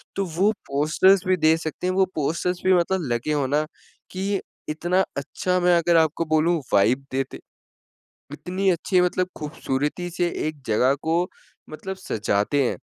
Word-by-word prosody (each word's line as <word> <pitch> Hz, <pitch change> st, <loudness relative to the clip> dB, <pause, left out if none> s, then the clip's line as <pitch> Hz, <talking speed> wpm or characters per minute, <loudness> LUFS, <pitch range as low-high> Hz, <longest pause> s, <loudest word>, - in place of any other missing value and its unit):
तो 195 Hz, -, 0 dB
वो 200 Hz, +4 st, +3 dB, 0.2 s
पोस्टर्स 165 Hz, +7 st, +4 dB
भी 185 Hz, 0 st, +3 dB
दे 155 Hz, 0 st, +4 dB
सकते 165 Hz, +2 st, -4 dB
हैं 185 Hz, -, +1 dB
वो 190 Hz, 0 st, +3 dB
पोस्टर्स 170 Hz, +4 st, -1 dB
भी 185 Hz, -, +5 dB
मतलब 175 Hz, -5 st, +1 dB
लगे 120 Hz, +6 st, -1 dB
हो 145 Hz, -2 st, +1 dB
ना 150 Hz, +3 st, +1 dB, 0.5 s
कि 195 Hz, +1 st, -1 dB, 0.3 s
इतना 175 Hz, +5 st, +1 dB
अच्छा 180 Hz, +6 st, -1 dB
मैं 175 Hz, -1 st, +4 dB
अगर 170 Hz, 0 st, +3 dB
आपको 160 Hz, +1 st, +2 dB
बोलूँ 165 Hz, +2 st, +2 dB
वाइब 120 Hz, +7 st, +3 dB
देते 135 Hz, +1 st, -3 dB, 0.9 s
इतनी 185 Hz, +5 st, -1 dB
अच्छी 180 Hz, +1 st, +2 dB
मतलब 180 Hz, 0 st, +1 dB
खूबसूरती 150 Hz, +3 st, -3 dB
से 175 Hz, 0 st, 0 dB, 0.2 s
एक 155 Hz, -3 st, -6 dB
जगह 125 Hz, +5 st, +3 dB
को 170 Hz, +3 st, +1 dB, 0.4 s
मतलब 190 Hz, +5 st, -6 dB
सजाते 110 Hz, -, 0 dB
हैं। 125 Hz, -, -1 dB
165 Hz, 160 wpm, -23 LUFS, 145-185 Hz, 0.9 s, भी